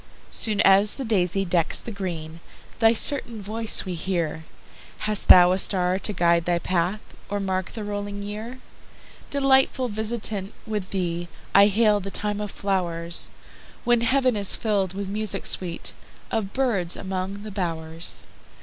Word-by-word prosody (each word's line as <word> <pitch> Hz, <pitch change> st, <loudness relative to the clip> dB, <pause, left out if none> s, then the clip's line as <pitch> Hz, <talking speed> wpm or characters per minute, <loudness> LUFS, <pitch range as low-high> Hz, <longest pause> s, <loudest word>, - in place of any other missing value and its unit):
Soon 215 Hz, -2 st, +1 dB
as 200 Hz, +1 st, +5 dB
the 270 Hz, -, -5 dB
daisy 195 Hz, -3 st, +1 dB
decks 170 Hz, -2 st, +1 dB
the 230 Hz, -, -6 dB
green, 170 Hz, -5 st, -6 dB, 0.4 s
Thy 225 Hz, -1 st, +6 dB
certain 235 Hz, -2 st, +3 dB
voice 215 Hz, +2 st, +1 dB
we 185 Hz, -, -4 dB
hear:Hast 170 Hz, +4 st, -3 dB
thou 180 Hz, 0 st, +8 dB
a 185 Hz, -, +1 dB
star 185 Hz, -1 st, +1 dB
to 205 Hz, -, 0 dB
guide 170 Hz, -3 st, +2 dB
thy 175 Hz, -1 st, +1 dB
path, 180 Hz, +4 st, -1 dB, 0.3 s
Or 205 Hz, -, -2 dB
mark 190 Hz, -1 st, -2 dB
the 220 Hz, -, -5 dB
rolling 205 Hz, 0 st, -5 dB
year? 215 Hz, +5 st, -6 dB, 0.7 s
Delightful 265 Hz, -2 st, +2 dB
visitant! 215 Hz, -2 st, -3 dB
with 210 Hz, -4 st, -4 dB
theeI 175 Hz, -2 st, -2 dB, 0.4 s
hail 210 Hz, 0 st, +3 dB
the 195 Hz, 0 st, -6 dB
time 210 Hz, +1 st, -3 dB
of 210 Hz, -, -4 dB
flow'rs, 170 Hz, -4 st, 0 dB, 0.5 s
When 240 Hz, -1 st, +3 dB
heav'n 255 Hz, 0 st, +2 dB
is 200 Hz, -2 st, +1 dB
fill'd 195 Hz, -4 st, -1 dB
with 200 Hz, 0 st, -4 dB
music 210 Hz, +1 st, -1 dB
sweetOf 195 Hz, +3 st, -2 dB
birds 210 Hz, -10 st, 0 dB
among 190 Hz, +2 st, -4 dB
the 215 Hz, -, -7 dB
bow'rs. 165 Hz, -3 st, -3 dB
200 Hz, 140 wpm, -24 LUFS, 180-215 Hz, 0.7 s, thou